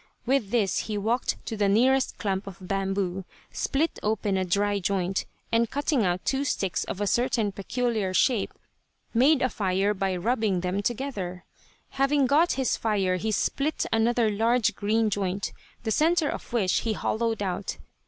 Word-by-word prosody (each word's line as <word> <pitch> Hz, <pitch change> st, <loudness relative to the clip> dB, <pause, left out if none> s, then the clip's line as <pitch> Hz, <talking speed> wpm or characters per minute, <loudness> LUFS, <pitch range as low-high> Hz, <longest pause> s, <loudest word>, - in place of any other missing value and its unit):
With 250 Hz, -5 st, +1 dB
this 210 Hz, -4 st, +1 dB
he 210 Hz, -, -1 dB
walked 225 Hz, +5 st, 0 dB
to 225 Hz, -, -4 dB
the 205 Hz, -2 st, +2 dB
nearest 260 Hz, +6 st, +3 dB
clump 195 Hz, -1 st, -2 dB
of 195 Hz, -, -8 dB
bamboo, 195 Hz, 0 st, -2 dB, 0.3 s
split 310 Hz, +4 st, -1 dB
open 210 Hz, -2 st, 0 dB
a 190 Hz, -, +1 dB
dry 200 Hz, +3 st, +1 dB
joint, 190 Hz, 0 st, -1 dB, 0.2 s
and 230 Hz, 0 st, +2 dB
cutting 285 Hz, -3 st, +1 dB
out 180 Hz, -1 st, -1 dB
two 270 Hz, +1 st, +1 dB
sticks 195 Hz, -9 st, -1 dB
of 190 Hz, -, -5 dB
a 205 Hz, -, 0 dB
certain 225 Hz, -1 st, +1 dB
peculiar 215 Hz, 0 st, -1 dB
shape 220 Hz, +3 st, +2 dB, 0.6 s
made 265 Hz, +5 st, +4 dB
a 255 Hz, -, +2 dB
fire 195 Hz, -1 st, 0 dB
by 190 Hz, -1 st, -1 dB
rubbing 210 Hz, -1 st, 0 dB
them 185 Hz, +2 st, -1 dB
together. 205 Hz, -7 st, -3 dB, 0.4 s
Having 275 Hz, +1 st, +2 dB
got 305 Hz, +7 st, +3 dB
his 265 Hz, -3 st, 0 dB
fire 195 Hz, -4 st, 0 dB
he 220 Hz, +5 st, -2 dB
split 280 Hz, +8 st, 0 dB
another 225 Hz, 0 st, +2 dB
large 225 Hz, +1 st, +2 dB
green 215 Hz, +2 st, +1 dB
joint, 195 Hz, 0 st, -2 dB, 0.3 s
the 220 Hz, -, -1 dB
center 320 Hz, -, +3 dB
of -, -, -6 dB
which 210 Hz, -6 st, +2 dB
he 225 Hz, -, -1 dB
hollowed 225 Hz, -1 st, -1 dB
out. 185 Hz, -2 st, -3 dB
215 Hz, 165 wpm, -26 LUFS, 195-245 Hz, 0.6 s, made